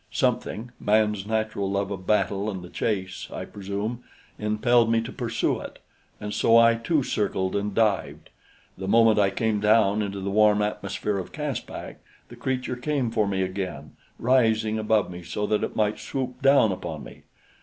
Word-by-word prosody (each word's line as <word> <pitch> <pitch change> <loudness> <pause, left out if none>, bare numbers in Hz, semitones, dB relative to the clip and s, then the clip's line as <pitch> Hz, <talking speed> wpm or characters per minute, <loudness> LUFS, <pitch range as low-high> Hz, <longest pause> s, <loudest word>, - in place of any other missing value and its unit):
Something 115 +3 -1
man's 105 -1 +1
natural 110 -3 -1
love 100 0 -1
of 95 -2 -6
battle 105 -1 +1
and 95 -4 -5
the 90 - -11
chase, 95 -4 -2
I - - -5
presume 105 +4 -5 0.4
impelled 115 +2 +2
me 115 - +3
to 115 +3 -6
pursue 120 -4 -1
it, - - -9 0.4
and 105 0 -5
so 115 0 +4
I 115 0 +7
too 135 +6 0
circled 95 -4 -1
and 100 0 -2
dived. 110 -3 0 0.5
The 95 - -4
moment 110 +1 +5
I 100 -1 +4
came 105 +2 0
down 105 0 +3
into 100 -1 -3
the 95 +1 -3
warm 105 0 +4
atmosphere 105 0 -2
of 95 - -7
Caspak, - - -5 0.3
the 120 - -11
creature 125 +1 -2
came 130 -1 -1
for 110 -3 +1
me 95 -1 0
again, 95 -6 -5 0.3
rising 110 -3 +2
above 110 -3 +1
me 90 0 -8
so 85 +5 -3
that 105 0 0
it - - -3
might 105 0 +1
swoop 130 -1 -4
down 135 -6 +5
upon 85 -5 -5
me. - - -12
105 Hz, 175 wpm, -25 LUFS, 100-115 Hz, 0.5 s, I